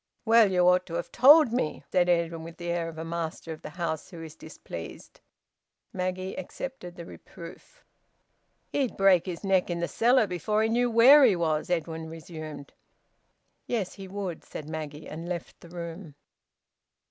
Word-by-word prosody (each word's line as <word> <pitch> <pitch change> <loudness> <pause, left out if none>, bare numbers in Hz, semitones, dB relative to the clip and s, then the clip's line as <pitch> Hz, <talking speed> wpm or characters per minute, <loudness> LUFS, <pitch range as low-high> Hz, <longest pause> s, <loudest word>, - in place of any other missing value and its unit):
"Well, 225 -3 +5
you 180 -1 +3
ought 180 0 +3
to 165 - -6
have 170 - -4
told 280 0 +7
me," 240 -11 -2
said 180 -1 +3
Edwin, 170 -1 +1
with 165 0 -10
the 175 0 -4
air 170 -1 -2
of 160 - -11
a 160 - -5
master 165 -1 -4
of 155 - -12
the - - -8
house 160 -1 -4
who 170 -3 -9
is 160 -1 -9
displeased. - - -10 0.7
Maggie 185 0 -3
accepted 185 -1 -7
the 170 - -9
reproof. 165 0 -13 0.9
"He'd 270 -4 -1
break 195 -2 +4
his 175 0 -5
neck 190 -2 +2
in 170 -1 -2
the 170 - -1
cellar 245 0 +3
before 210 +4 -1
he 220 - +1
knew 240 +2 +2
where 255 +6 +8
he 225 -7 +5
was," 160 0 -1
Edwin 165 -2 -2
resumed. 155 -3 -9 0.9
"Yes, 215 -7 -2
he 195 -1 -9
would," 190 -3 -5
said 150 - -8
Maggie, 155 -1 -6
and 165 +3 -7
left 175 -2 -6
the 170 - -13
room. 170 -2 -8
175 Hz, 170 wpm, -27 LUFS, 165-200 Hz, 0.9 s, where